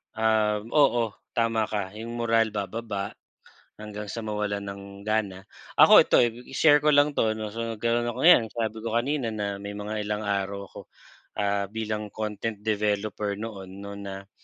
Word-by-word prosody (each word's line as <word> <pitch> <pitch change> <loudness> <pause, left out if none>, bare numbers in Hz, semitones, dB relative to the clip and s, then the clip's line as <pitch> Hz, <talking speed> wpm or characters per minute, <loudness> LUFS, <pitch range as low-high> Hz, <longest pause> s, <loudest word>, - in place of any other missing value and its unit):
um, 110 -1 +1
oo, 120 -7 +3 0.2
tama 115 -2 +1
ka 100 -3 -3
'yong 115 +3 -7
moral 115 -2 +1
bababa 100 0 -3 0.7
hanggang 105 -1 -7
sa 115 +1 -5
mawalan 105 -1 -2
ng 100 0 -7 0.2
gana. 100 -3 -1 0.3
Ako - - +9
ito, - - +3
eh, 120 -2 +4
ib 120 +2 -13
i-share 145 +1 +5
ko 150 - +3
lang 145 0 +4
'to, 110 -4 +1
'no, 105 -1 -5
so 115 - -4 0.2
nagkaroon 120 +2 0
ako, 120 - -5
ngayon 170 -10 +8
sabi 110 -1 -3
ko 115 - -3
kanina 130 -1 0
na 100 -2 -3
may 100 0 -6
mga 105 +1 -3
ilang 105 +1 -3
araw 100 0 -2
ako, - - -8 0.6
ah, 100 0 +1
bilang 105 0 -4
content 105 0 -4
developer 105 -1 -1
noon, 100 -2 -7
'no, 100 0 -7
na 100 0 -8
105 Hz, 170 wpm, -26 LUFS, 100-115 Hz, 0.7 s, Ako